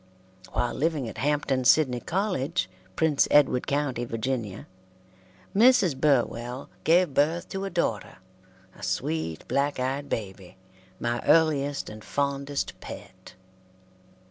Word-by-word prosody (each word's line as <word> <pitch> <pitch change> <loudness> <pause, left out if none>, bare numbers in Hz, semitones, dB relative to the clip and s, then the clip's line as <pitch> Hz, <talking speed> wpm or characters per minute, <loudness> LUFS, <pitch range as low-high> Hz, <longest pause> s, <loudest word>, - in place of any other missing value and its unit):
While 120 - 0
living 150 -4 -1
at 110 - -8
Hampton 140 -1 0
Sidney 130 -1 +4
College, 170 - -1 0.3
Prince 155 -3 +3
Edward 140 -4 +4
County, 140 -4 -1
Va., 115 -1 -4 1.4
Mrs. 210 - +5
Burwell 125 -2 0
gave 170 -2 +4
birth 160 +5 +1
to 195 0 -4
a - - -3
daughter, 115 - -2 0.6
a - - -16
sweet, 80 0 -2
black 140 0 0
eyed 135 +3 -2
baby, 95 -4 -5 0.4
my 120 0 -1
earliest 145 -3 +3
and 110 0 -9
fondest 140 +2 -2
pet. - - -11
140 Hz, 115 wpm, -26 LUFS, 120-155 Hz, 1.4 s, Mrs